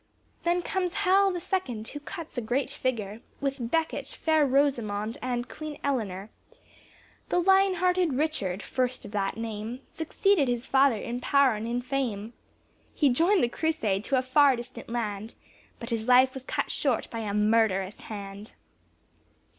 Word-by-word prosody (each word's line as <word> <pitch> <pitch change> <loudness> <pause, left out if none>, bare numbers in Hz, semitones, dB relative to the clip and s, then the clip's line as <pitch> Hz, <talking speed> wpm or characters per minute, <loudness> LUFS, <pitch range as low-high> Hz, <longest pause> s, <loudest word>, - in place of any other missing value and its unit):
Then 350 +1 +2
comes 365 -2 -2
Hal 390 +1 +5
the 355 - -3
second, 255 - -3
who 290 - -7
cuts 325 +2 -8
a 245 - -1
great 245 +4 -1
figure 220 -4 -3 0.2
With 270 -4 -2
Becket, 325 +3 -1
fair 315 -2 +2
Rosamond 235 -4 0
and 245 -1 -2
Queen 310 -1 -7
Eliner. 210 -8 -2 1.0
The - - +1
Lion 385 +1 +4
hearted 360 -3 +2
Richard, 250 - -1
first 255 -1 -1
of - - -9
that 200 -1 -1
name, 225 +1 -4
Succeeded 325 0 +1
his 245 -1 -1
father 270 -2 +4
in 240 +3 -4
power 275 0 +4
and 215 +1 -4
in 240 +1 -2
fame; 240 -5 -2 0.6
He 290 - +4
joined 340 +9 +3
the - - +4
Crusade 235 -8 -1
to 275 - +1
a 255 - +1
far 270 +1 +5
distant 240 -1 -9
land 220 -2 -3 0.4
But 235 0 -6
his 225 0 -1
life 255 +1 +6
was 265 - -6
cut 260 - -2
short 265 -6 0
by 230 - -4
a 215 -2 -3
murderous 210 -2 +2
hand. 200 0 -8
250 Hz, 160 wpm, -27 LUFS, 220-300 Hz, 1.0 s, life